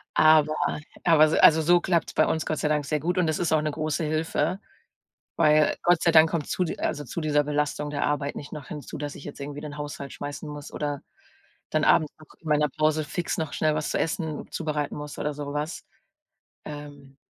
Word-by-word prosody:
Aber 155 -1 +5 0.5
aber 155 -3 +6
so - - +1
also, 160 0 +7
so 175 +3 +5
klappt's 170 -3 0
bei - - +3
uns 160 - -1
Gott 155 - -1
sei - - 0
Dank 150 -1 +1
sehr 150 +1 0
gut 175 +5 -1
und 175 -3 +2
es 155 - -1
ist 170 -2 +1
auch 155 - +3
'ne 155 0 -1
große 155 +1 -2
Hilfe, 160 +4 -1 0.8
weil 150 0 +4
Gott 175 -1 +4
sei 170 - +4
Dank 160 0 +7
kommt 165 -4 -2
zu 185 - 0
di 160 - -5
also, 145 - -2
zu 170 - -5
dieser 150 -1 +2
Belastung 150 0 -1
der 145 - -1
Arbeit 145 -1 -1
nicht 145 - -8
noch 150 -3 -8
hinzu, 150 -2 -7
dass 145 0 -5
ich - - -10
jetzt 145 - -8
irgendwie 145 +1 -6
den 150 -1 -7
Haushalt 145 -1 -6
schmeißen 145 +1 -6
muss 145 -1 -8
oder 145 -2 -3 0.7
dann 155 0 +1
abends 155 -2 +4
noch 155 - -15
in 160 - -9
meiner 150 0 +3
Pause 155 +2 +1
fix 170 +4 -3
noch 155 -3 -2
schnell 155 -1 +1
was 155 - -2
zu - - 0
essen 160 -2 -3
zubereiten 150 -3 -3
muss 150 0 -7
oder 150 - -1
so 145 0 -5
was. 150 +3 -4 0.8
Ähm, 145 -2 -10
150 Hz, 220 wpm, -26 LUFS, 145-160 Hz, 0.8 s, also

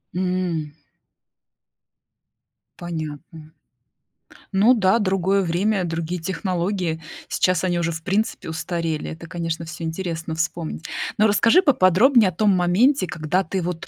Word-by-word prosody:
М. 180 -5 -2 2.1
Понятно. 160 -1 -7 1.0
Ну 205 +6 +5
да, 210 -2 +3
другое 195 -1 +1
время, 190 +2 0
другие 165 +1 -3
технологии, 180 -2 -2 0.3
сейчас 185 -1 +1
они 175 -2 0
уже 170 0 0
в 160 0 -7
принципе 200 -3 -1
устарели, 165 -1 -3
это, 165 +1 -9
конечно, 165 -1 -4
всё 170 +1 -8
интересно 165 -1 -4
вспомнить. 160 0 -3 0.3
Но 215 +1 +5
расскажи 230 - +4
поподробнее 235 - +4
о - - -8
том 210 +5 +2
моменте, 185 +7 +3
когда 175 +3 -1
ты 190 +3 -2
вот 175 -1 -4
180 Hz, 120 wpm, -22 LUFS, 165-195 Hz, 2.1 s, Ну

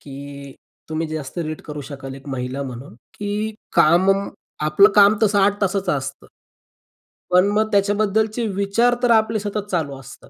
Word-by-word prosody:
की 140 0 -10 0.4
तुम्ही 160 +1 -2
जास्त 155 0 -6
रीड 155 -2 -4
करू 150 -1 -7
शकाल 135 -2 -8
एक 135 +1 -13
महिला 130 +1 -4
म्हणून, 125 -2 -8 0.2
की 210 +1 -3 0.2
काम 170 +5 +4 0.6
आपलं 195 +7 +6
काम 205 0 +7
तसं 205 -1 +3
8 200 +1 +2
तासाचं 195 -1 0
असतं. 135 +1 -8 1.1
पण 180 +2 +5
मग 215 +1 +1
त्याच्याबद्दलचे 210 +3 +1
विचार 200 +5 +2
तर 245 - +4
आपले 220 -1 +3
सतत 205 0 -4
चालू 145 -7 -2
असतात. 135 +1 -14
190 Hz, 150 wpm, -21 LUFS, 140-205 Hz, 1.1 s, काम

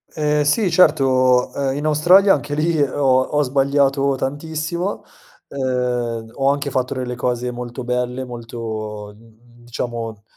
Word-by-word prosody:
Ehm, 150 -1 +1
sì 190 +7 +2
certo, 135 -7 +3
ehm, 135 -1 -2
in 145 - -4
Australia 175 +6 +5
anche 145 0 -3
lì 160 +1 0
ho 140 +1 -1 0.2
ho 150 +2 0
sbagliato 140 0 +1
tantissimo. 160 +7 -3 0.4
Ehm, 125 -4 -2
ho 135 0 +1
anche 145 0 -2
fatto 130 0 -1
delle 125 -1 -4
cose 125 0 -2
molto 120 +1 -7
belle, 125 +1 -2
molto, 110 -3 -6
mhmm, 115 +2 -22
diciamo, 115 -3 -5
130 Hz, 135 wpm, -20 LUFS, 120-145 Hz, 0.4 s, Australia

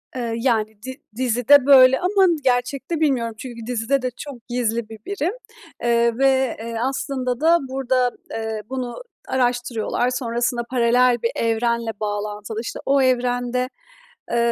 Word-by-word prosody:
Eee, 235 -2 -3
yani, 220 -4 0
di 260 +2 -8
dizide 250 +2 +4
böyle 265 -2 +7
ama 380 +1 +3 0.2
gerçekte 265 +5 0
bilmiyorum 245 -7 0
çünkü 235 -2 -8
dizide 250 +3 0
de 255 - -1
çok 255 -6 -9
gizli 235 -2 -1
bir 220 -1 -10
birim, 385 -1 -2 0.5
eee, 235 0 +2
ve, 265 -2 +2
eee, 230 +1 -6
aslında 260 -3 -3
da 335 +2 +5
burada, 260 -1 0 0.2
eee, 220 -1 -4
bunu 255 -2 -4 0.3
araştırıyorlar, 245 -1 0
sonrasında 240 -1 -1
paralel 245 0 +3
bir 230 - +1
evrenle 230 0 0
bağlantılı, 210 +1 -4
işte, - - -6
o 275 0 +3
evrende, 250 0 0 0.6
eee, 235 - +1
245 Hz, 135 wpm, -22 LUFS, 230-260 Hz, 0.6 s, böyle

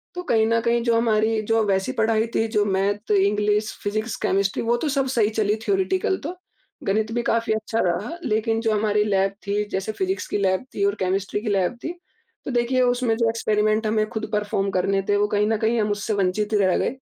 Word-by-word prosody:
तो 360 - -4
कहीं 220 -7 +2
न 230 0 +2
कहीं 235 0 +1
जो 235 -1 +2
हमारी 220 -1 +2
जो 225 -1 +3
वैसी 190 -1 0
पढ़ाई 220 0 +1
थी 225 - +2
जो 215 -2 +1
मैथ, 200 +2 -1
इंग्लिश, 210 +1 +2
फिजिक्स, 215 +2 -2
केमिस्ट्री, 195 0 0
वो 235 +1 +1
तो 295 +5 -2
सब 275 -1 0
सही 230 -5 +2
चली 210 -1 0
थ्योरेटिकल 380 -1 +1
तो 340 +5 -4 0.5
गणित 215 +3 +1
भी 240 - 0
काफ़ी 230 -1 +1
अच्छा 220 +1 -2
रहा। 205 - -2
लेकिन 225 -1 0
जो 225 -1 +1
हमारी 210 0 +2
लैब 195 -1 +1
थी 205 +1 0
जैसे 190 +3 -2
फिजिक्स 380 - -2
की - - -1
लैब 190 +4 +1
थी 200 - -1
और 200 +1 +1
केमिस्ट्री 195 +2 -1
की 220 - -3
लैब 195 +2 +1
थी। 330 - -3 0.5
तो 270 - -3
देखिए 245 +1 +1
उसमें 245 -2 +2
जो 230 -1 +2
एक्सपेरिमेंट 215 -1 +1
हमें 215 0 +1
खुद 220 -1 -4
परफॉर्म 205 -1 0
करने 195 +1 +1
थे, 205 - +3
वो 205 - +2
कहीं 205 0 +1
न 220 0 +1
कहीं 225 +2 +1
हम 210 - 0
उससे 205 +1 -2
वंचित 205 +2 0
रह 195 -3 +3
गए 260 - -1
215 Hz, 215 wpm, -23 LUFS, 205-230 Hz, 0.5 s, जो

